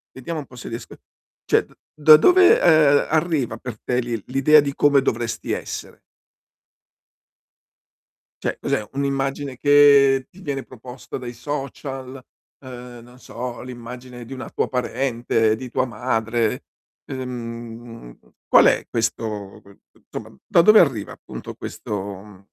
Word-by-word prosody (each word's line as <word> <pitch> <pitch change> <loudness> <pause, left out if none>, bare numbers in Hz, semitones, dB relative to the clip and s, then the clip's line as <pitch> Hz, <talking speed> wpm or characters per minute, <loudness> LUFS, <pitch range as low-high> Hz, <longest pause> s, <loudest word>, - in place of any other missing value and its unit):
Vediamo 155 +5 -5
un 140 - -7
po' 125 - -16
se 125 - -8
riesc 115 - -7 0.5
cioè, - - +3
d - - -23 0.2
da 155 0 +8
dove, 365 - +6
uhm, 155 -4 +5
arriva 155 -8 0
per 115 -2 -8
te 125 0 0
lil 120 -3 -3
l'idea 135 +4 +5
di 140 -1 0
come 145 -1 +4
dovresti 115 -2 -2
essere? - - -5 2.4
Cioè, - - -2
cos'è, 105 - -2
un'immagine 135 -1 -2
che 140 -2 +5
ti 185 - -17
viene 140 -7 -4
proposta 125 +1 -9
dai 125 -1 -7
social? 135 0 -6 0.4
Uhm, 125 -2 -10
non 125 +1 -17
so, 125 -1 -7
l'immagine 125 0 -9
di 120 - -13
una 130 -1 -7
tua - - -2
parente, 120 -3 0
di 130 +2 -8
tua 130 - 0
madre? 115 -1 -1 0.5
Uhm, 115 - -7 0.3
qual - - +6
è - - +1
questo 110 -3 -3
que 100 0 -19
t - - -28
insomma, - - -8
da 170 - +5
dove 215 +5 +7
arriva 125 - +1
appunto - - -9
questo - - -7 0.3
mh 100 -2 -16
125 Hz, 140 wpm, -22 LUFS, 115-140 Hz, 2.4 s, da